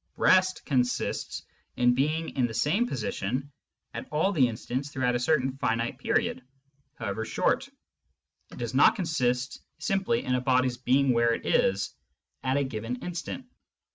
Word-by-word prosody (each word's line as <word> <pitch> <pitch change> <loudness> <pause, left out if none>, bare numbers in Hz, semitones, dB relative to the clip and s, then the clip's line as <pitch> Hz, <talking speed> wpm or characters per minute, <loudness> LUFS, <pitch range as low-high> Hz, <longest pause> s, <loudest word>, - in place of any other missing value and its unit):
Rest 185 0 +3
consists 125 -4 -1 0.3
in 125 0 +4
being 155 +5 0
in 125 -3 0
the 115 - -7
same 195 - +2
position 130 - -3 0.4
at - - -6
all 155 +6 +1
the 140 -10 +4
instants 125 +4 -4
throughout 130 -3 0
a 120 - +1
certain 130 0 +2
finite 115 -1 -1
period, - - 0 0.5
however 100 +3 -3
short; 265 - 0 0.8
it - - -11
does - - -4
not - - +6
consist 130 - -1 0.2
simply 195 +5 0
in 125 - 0
a 125 - +1
body's 130 -1 +2
being 130 +2 +3
where 115 0 +3
it - - -9
is 95 +1 +2 0.5
at 130 +1 0
a 140 - +2
given 115 -2 -4
instant. 180 +9 -5
130 Hz, 150 wpm, -28 LUFS, 120-155 Hz, 0.8 s, not